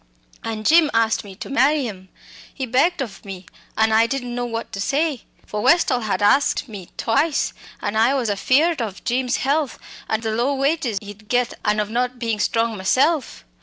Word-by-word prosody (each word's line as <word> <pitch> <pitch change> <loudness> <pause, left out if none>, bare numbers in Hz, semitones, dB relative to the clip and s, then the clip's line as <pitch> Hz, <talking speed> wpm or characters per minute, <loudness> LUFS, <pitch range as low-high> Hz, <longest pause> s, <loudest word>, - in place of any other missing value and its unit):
An' 220 -1 -4
Jim 315 +5 +5
asked 225 0 +2
me 195 -2 -11
to - - -8
marry 275 +2 +2
him 190 -4 -8 0.4
he 265 - -4
begged 270 +6 +2
of 200 -7 -10
me 190 -2 -8 0.3
an' 220 0 +3
I 225 +1 +4
didn't 245 -1 -3
know 245 0 -2
what 230 -1 -5
to 195 - -5
say. 285 +2 0 0.2
For 210 - -4
Westall 285 -3 +3
had 215 -2 -2
asked 275 +6 +3
me 200 -6 -9
twice; 280 +6 +1 0.3
an' 205 - -2
I 230 +5 +3
was 255 -4 0
afeard 265 - +2
of 210 -4 -5
Jim's 250 +1 0
health, 280 -1 0 0.3
an' 220 - 0
the 220 -1 -2
low 245 +6 0
wages 275 -5 0
he'd 205 +1 -11
get, 245 -1 +1
an' 210 0 +1
of 210 0 -2
not 250 +1 -1
bein' 230 -3 -2
strong 230 +1 +1
myself. 270 - +1
240 Hz, 190 wpm, -21 LUFS, 215-275 Hz, 0.4 s, Jim